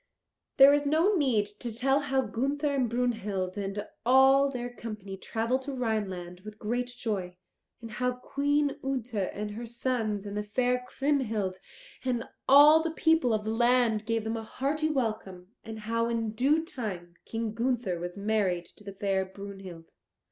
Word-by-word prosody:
There 275 +1 +9
is 290 0 +1
no 325 +8 +3
need 260 - +2
to 240 - -4
tell 270 +5 +2
how 270 -2 +1
Gunther 280 +6 -2
and 260 -4 +1
Brunhild 215 -6 -1
and 205 0 -4 0.2
all 265 +2 +6
their 245 -2 -5
company 210 -5 -7
travelled 230 +6 -1
to 280 +1 -6
Rhineland 195 -8 -3
with 210 +2 -10
great 240 +4 -2
joy, 205 -7 -4 0.4
and 230 -1 -8
how 250 +3 -1
Queen 285 +3 0
Ute 255 -3 -3
and 210 +1 -2
her 230 +3 -6
sons 225 -4 -2
and 205 0 -6
the 210 - -1
fair 250 +4 0
Kriemhild, 225 -11 -1 0.5
and 245 -3 -1 0.3
all 295 +3 +8
the 330 - -1
people 320 -5 +2
of 215 -1 0
the 220 - -1
land, 235 -2 +2
gave 230 -1 0
them 225 +1 -2
a 225 - -5
hearty 290 +7 -1
welcome 215 -9 -3
and 220 -1 -8
how 230 +2 0
in 230 -2 -1
due 280 +8 +2
time 185 - -6
King 225 -1 -4
Gunther 230 -6 -1
was 175 +2 -6
married 200 -4 0
to - - -14
the 200 -1 -8
fair 195 -1 0
Brunhild. 190 -3 -10
230 Hz, 165 wpm, -29 LUFS, 205-265 Hz, 0.5 s, There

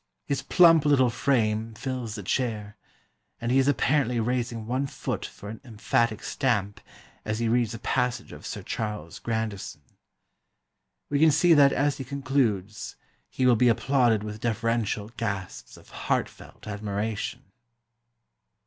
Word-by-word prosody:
His 140 -1 -1
plump 165 +2 +6
little 130 -4 +4
frame 110 -3 0
fills 125 -3 -4
the 105 - -6
chair, 105 -1 -2 0.6
and 115 +1 -2
he 135 - +4
is 135 - +2
apparently 135 -3 +2
raising 120 -1 -2
one 130 +4 -1
foot - - -4
for 100 - -12
an 110 +1 -8
emphatic 115 -1 0
stamp, 105 -7 -1 0.4
as 110 0 -2
he 115 0 0
reads 115 -1 +1
a - - -5
passage 125 +1 -1
of - - -11
Sir - - -6
Charles 105 -7 -4
Grandison. 110 -9 -4 1.3
We 140 - +2
can 160 +1 +6
see 165 +4 +5
that 140 -2 +6
as 145 +1 +1
he - - -3
concludes 120 -7 -1 0.3
he 130 - -1
will 125 -1 +6
be 125 +2 +3
applauded 120 -3 +2
with 105 0 -7
deferential 115 -2 -1
gasps 100 -5 -4
of - - -18
heartfelt - - -3
admiration." 105 +3 -3
115 Hz, 140 wpm, -26 LUFS, 110-130 Hz, 1.3 s, plump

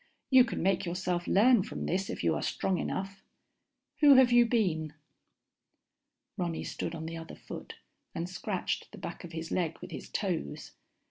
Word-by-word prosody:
You 260 -1 +8
can 230 - -3
make 190 0 +2
yourself 180 0 -2
learn 230 +2 +5
from 210 - -5
this 190 +2 -1
if - - -4
you - - +3
are - - -2
strong 190 -2 -1
enough. 195 0 -4 0.8
Who 290 -3 +8
have 260 -2 +6
you 240 0 +6
been?_ 170 -10 0 1.4
Ronny 175 -3 -2
stood 170 - -4
on 160 -1 -6
the 165 +1 -5
other 165 0 -8
foot - - -9 0.4
and 170 +1 -2
scratched 185 - -3
the - - -11
back - - -7
of 175 -1 -9
his 165 0 -5
leg 165 -3 0
with - - -9
his - - -7
toes. 70 0 -3
185 Hz, 175 wpm, -30 LUFS, 165-220 Hz, 1.4 s, You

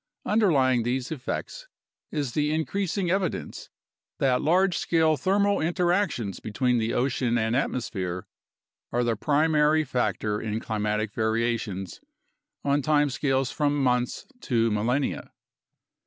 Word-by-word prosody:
Underlying 140 - +3
these 125 +3 -2
effects 330 - -5 0.4
is 145 -5 -2
the 150 +3 0
increas 165 +5 -1
ing 180 -4 0
evidence 190 -1 -2 0.5
that 130 -2 +2
large 180 +3 +3
scale 160 -2 +2
thermal 200 +4 +1
interactions 175 - 0
between 120 +3 0
the 110 +1 -1
ocean 125 -2 0
and 110 +1 0
atmosphere 95 -9 -2 0.7
are 120 +1 +1
the 120 -1 +1
primary 150 +4 +3
factor 110 -5 -1
in 110 0 -2
climatic 105 -1 -2
variations 110 -4 -2 0.6
on 145 +1 +2
time 145 0 +2
scales 135 -1 0
from 145 -1 0
months 125 -1 0 0.2
to 115 -3 +1
millenia. 120 +7 -1
130 Hz, 120 wpm, -26 LUFS, 115-155 Hz, 0.7 s, Underlying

